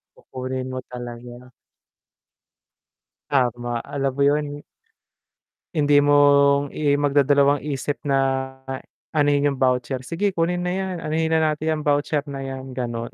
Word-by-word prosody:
Kukunin 130 Hz, 0 st, -5 dB
mo 130 Hz, -, -3 dB
talaga. 120 Hz, 0 st, -9 dB, 1.8 s
Tama, 120 Hz, -3 st, 0 dB
alam 135 Hz, -1 st, -2 dB
mo 140 Hz, -, -2 dB
yun 145 Hz, 0 st, 0 dB, 1.1 s
hindi 145 Hz, -3 st, +3 dB
mong, 140 Hz, 0 st, +5 dB
i 145 Hz, 0 st, 0 dB
magdadalawang 145 Hz, 0 st, +3 dB
isip 145 Hz, 0 st, -2 dB
na 135 Hz, -1 st, 0 dB, 0.6 s
anohin 145 Hz, -1 st, +2 dB
yung 140 Hz, -, -4 dB
voucher, 130 Hz, 0 st, 0 dB
"Sige 175 Hz, +9 st, 0 dB
kunin 175 Hz, -1 st, -1 dB
na 180 Hz, -, -1 dB
yan, 190 Hz, 0 st, -2 dB
anohin 160 Hz, +1 st, -1 dB
na 160 Hz, -, +3 dB
natin 155 Hz, +1 st, -2 dB
yan 155 Hz, -, -3 dB
voucher 145 Hz, 0 st, +1 dB
na 135 Hz, -1 st, -5 dB
yan," 130 Hz, -1 st, -7 dB
ganon. 120 Hz, -2 st, -4 dB
140 Hz, 130 wpm, -23 LUFS, 130-150 Hz, 1.8 s, mong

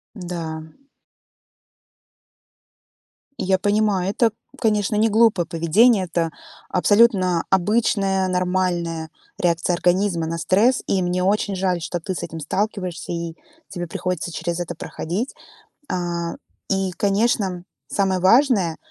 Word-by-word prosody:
Да. 170 Hz, -5 st, -5 dB, 2.8 s
Я 190 Hz, 0 st, +2 dB
понимаю, 205 Hz, -2 st, +1 dB
это, 225 Hz, +1 st, +2 dB, 0.3 s
конечно, 210 Hz, -3 st, +1 dB
не 220 Hz, +2 st, +3 dB
глупое 215 Hz, -5 st, +3 dB
поведение. 185 Hz, +6 st, +3 dB
Это 170 Hz, -1 st, -1 dB, 0.4 s
абсолютно 185 Hz, -3 st, +3 dB
обычная 195 Hz, -1 st, +2 dB
нормальная 180 Hz, -3 st, -1 dB, 0.3 s
реакция 170 Hz, 0 st, +1 dB
организма 180 Hz, -1 st, +1 dB
на 165 Hz, +1 st, -3 dB
стресс, 210 Hz, +9 st, +2 dB
и 190 Hz, -, +1 dB
мне 180 Hz, 0 st, 0 dB
очень 200 Hz, +1 st, +1 dB
жаль, 185 Hz, -2 st, 0 dB
что 175 Hz, -, -3 dB
ты 185 Hz, +3 st, -4 dB
с -, -, -5 dB
этим 165 Hz, -, -6 dB
сталкиваешься 185 Hz, +2 st, -3 dB
и 170 Hz, -1 st, -4 dB, 0.3 s
тебе 175 Hz, -2 st, -5 dB
приходится 180 Hz, 0 st, -3 dB
через 170 Hz, +2 st, -3 dB
это 175 Hz, -, -4 dB
проходить. 195 Hz, -, -4 dB, 0.6 s
А, 175 Hz, -2 st, -2 dB, 0.3 s
и, 195 Hz, -1 st, 0 dB
конечно, 200 Hz, -2 st, 0 dB, 0.2 s
самое 190 Hz, -2 st, +1 dB
важное, 195 Hz, -, +4 dB
185 Hz, 115 wpm, -22 LUFS, 175-205 Hz, 2.8 s, важное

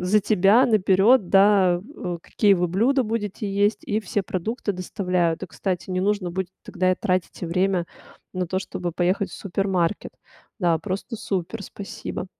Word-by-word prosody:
за 190 Hz, +4 st, +3 dB
тебя 205 Hz, +3 st, +4 dB
наперёд, 205 Hz, 0 st, +4 dB
да, 195 Hz, -2 st, +5 dB, 0.2 s
э, 175 Hz, -1 st, -3 dB
какие 205 Hz, +3 st, +3 dB
вы 180 Hz, -1 st, +1 dB
блюда 240 Hz, +10 st, +2 dB
будете 215 Hz, -2 st, -3 dB
есть 205 Hz, +2 st, +1 dB
и 215 Hz, +1 st, -1 dB
все 205 Hz, 0 st, -2 dB
продукты 205 Hz, +3 st, -3 dB
доставляют. 180 Hz, -2 st, -1 dB
И, -, -, -10 dB
кстати, 180 Hz, +3 st, -4 dB
не 185 Hz, 0 st, 0 dB
нужно 200 Hz, -2 st, 0 dB
будет 190 Hz, 0 st, -2 dB, 0.2 s
тогда 185 Hz, 0 st, 0 dB
и -, -, +3 dB
тратить 185 Hz, -1 st, -2 dB
время 180 Hz, +1 st, 0 dB, 0.5 s
на 185 Hz, 0 st, -1 dB
то, 185 Hz, -, 0 dB
чтобы 180 Hz, -2 st, -4 dB
поехать 180 Hz, +4 st, 0 dB
в -, -, -9 dB
супермаркет. 195 Hz, -1 st, -1 dB, 0.5 s
Да, 175 Hz, -5 st, +2 dB
просто 195 Hz, +6 st, -5 dB
супер. 195 Hz, -2 st, -3 dB
Спасибо. 195 Hz, -1 st, -7 dB
190 Hz, 160 wpm, -23 LUFS, 180-205 Hz, 0.5 s, да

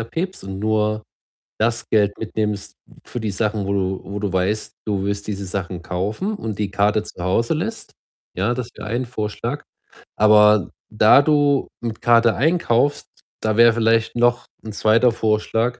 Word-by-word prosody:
abhebst 165 Hz, +12 st, -4 dB
und 95 Hz, 0 st, -7 dB
nur 110 Hz, 0 st, 0 dB, 0.5 s
das 115 Hz, +2 st, 0 dB
Geld 100 Hz, -2 st, +2 dB
mitnimmst 105 Hz, -2 st, -3 dB, 0.3 s
für 120 Hz, -, -6 dB
die 110 Hz, -2 st, -2 dB
Sachen, 105 Hz, 0 st, -1 dB
wo 100 Hz, -, -1 dB
du 95 Hz, -1 st, -1 dB
wo 100 Hz, +1 st, -6 dB
du 100 Hz, -3 st, -3 dB
weißt, 95 Hz, +4 st, -1 dB
du 100 Hz, -2 st, -1 dB
wirst 100 Hz, 0 st, -3 dB
diese 100 Hz, -2 st, -4 dB
Sachen 90 Hz, -1 st, -5 dB
kaufen 105 Hz, -, -3 dB
und 110 Hz, -, -5 dB
die 100 Hz, -2 st, -2 dB
Karte 105 Hz, +2 st, +1 dB
zu 90 Hz, -, -10 dB
Hause 115 Hz, -, +1 dB
lässt. 210 Hz, +9 st, -4 dB, 0.4 s
Ja, 100 Hz, +7 st, 0 dB
das 125 Hz, -1 st, -4 dB
wäre -, -, -8 dB
ein 120 Hz, +3 st, -1 dB
Vorschlag. 120 Hz, +4 st, -4 dB, 0.6 s
Aber 105 Hz, -2 st, +5 dB, 0.2 s
da 110 Hz, +5 st, +6 dB
du 145 Hz, -2 st, +2 dB
mit 115 Hz, -2 st, -5 dB
Karte 115 Hz, -1 st, +4 dB
einkaufst, 145 Hz, -2 st, +1 dB, 0.3 s
da 110 Hz, -1 st, 0 dB
wäre 115 Hz, 0 st, +7 dB
vielleicht 115 Hz, +1 st, +1 dB
noch 120 Hz, 0 st, +2 dB, 0.2 s
'n 110 Hz, -, -6 dB
2. 115 Hz, +3 st, +3 dB
Vorschlag, 115 Hz, +2 st, 0 dB
110 Hz, 165 wpm, -21 LUFS, 100-120 Hz, 0.6 s, wäre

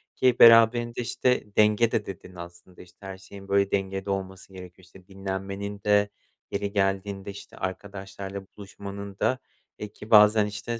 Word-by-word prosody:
ki 125 Hz, -2 st, +3 dB
beraberinde, 115 Hz, +1 st, +6 dB
işte, 125 Hz, +1 st, 0 dB
denge 105 Hz, +2 st, +4 dB
de 105 Hz, -, -1 dB
dedin 95 Hz, -1 st, -10 dB
aslında. 85 Hz, +1 st, -12 dB
İşte, 90 Hz, -1 st, -18 dB
her 95 Hz, -1 st, -7 dB
şeyin, 95 Hz, +1 st, -13 dB
böyle, 100 Hz, 0 st, +2 dB
dengede 95 Hz, 0 st, -2 dB
olması 95 Hz, 0 st, -5 dB
gerekiyor. 90 Hz, 0 st, -12 dB
İşte, 90 Hz, +1 st, -18 dB
dinlenmenin 95 Hz, +1 st, -5 dB
de 105 Hz, 0 st, +3 dB, 0.4 s
yeri 100 Hz, 0 st, -2 dB
geldiğinde, 95 Hz, 0 st, -1 dB
işte, 100 Hz, -, -12 dB
arkadaşlarla 95 Hz, 0 st, -6 dB
buluşmanın 100 Hz, 0 st, -9 dB
da, 130 Hz, -, +1 dB, 0.4 s
eee, 105 Hz, -, -5 dB
ki 105 Hz, -, -12 dB
bazen, 105 Hz, 0 st, +7 dB
işte, 105 Hz, +3 st, -5 dB
100 Hz, 150 wpm, -26 LUFS, 95-105 Hz, 0.4 s, bazen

